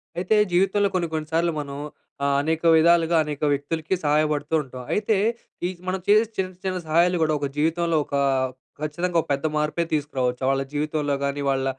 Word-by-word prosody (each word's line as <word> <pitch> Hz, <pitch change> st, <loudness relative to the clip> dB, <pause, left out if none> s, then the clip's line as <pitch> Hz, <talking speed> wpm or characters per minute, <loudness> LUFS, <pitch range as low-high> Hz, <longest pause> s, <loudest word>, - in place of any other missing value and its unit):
అయితే 185 Hz, +5 st, +1 dB, 0.2 s
జీవితంలో 195 Hz, +3 st, +3 dB
కొన్ని, 180 Hz, -2 st, 0 dB
కొన్ని 155 Hz, -1 st, -2 dB
సార్లు 170 Hz, +1 st, +2 dB
మనం 140 Hz, -1 st, -7 dB, 0.5 s
ఆహ్, 140 Hz, 0 st, +2 dB
అనేక 160 Hz, +2 st, -1 dB
విధాలుగా, 170 Hz, +1 st, +4 dB
అనేక 150 Hz, -2 st, -6 dB
వ్యక్తులకి 155 Hz, +5 st, -2 dB
సహాయపడుతూ 150 Hz, 0 st, +1 dB
ఉంటాం. 130 Hz, -2 st, -9 dB
అయితే 215 Hz, +1 st, +1 dB, 0.5 s
ఈ -, -, -2 dB, 0.2 s
మనం 185 Hz, +1 st, -1 dB
చేసే 210 Hz, +2 st, +6 dB
చిన్న, 185 Hz, -1 st, -1 dB
చిన్న 185 Hz, -1 st, -1 dB
సహాయాలు 170 Hz, +3 st, +3 dB
గూడా 155 Hz, -1 st, +1 dB
ఒక 140 Hz, -, -1 dB
జీవితంలో 165 Hz, +1 st, +1 dB
ఒక -, -, -14 dB, 0.7 s
ఖచ్చితంగా 170 Hz, +4 st, -1 dB
ఒక -, -, -3 dB
పెద్ద 140 Hz, +2 st, -3 dB
మార్పే 150 Hz, +3 st, 0 dB
తీసుకురావచ్చు. 130 Hz, -5 st, -1 dB
వాళ్ళ 135 Hz, 0 st, 0 dB
జీవితంలో 150 Hz, -1 st, -1 dB
గానీ, 140 Hz, +1 st, -2 dB
వాళ్ళ 135 Hz, -1 st, 0 dB
155 Hz, 170 wpm, -24 LUFS, 145-175 Hz, 0.7 s, చేసే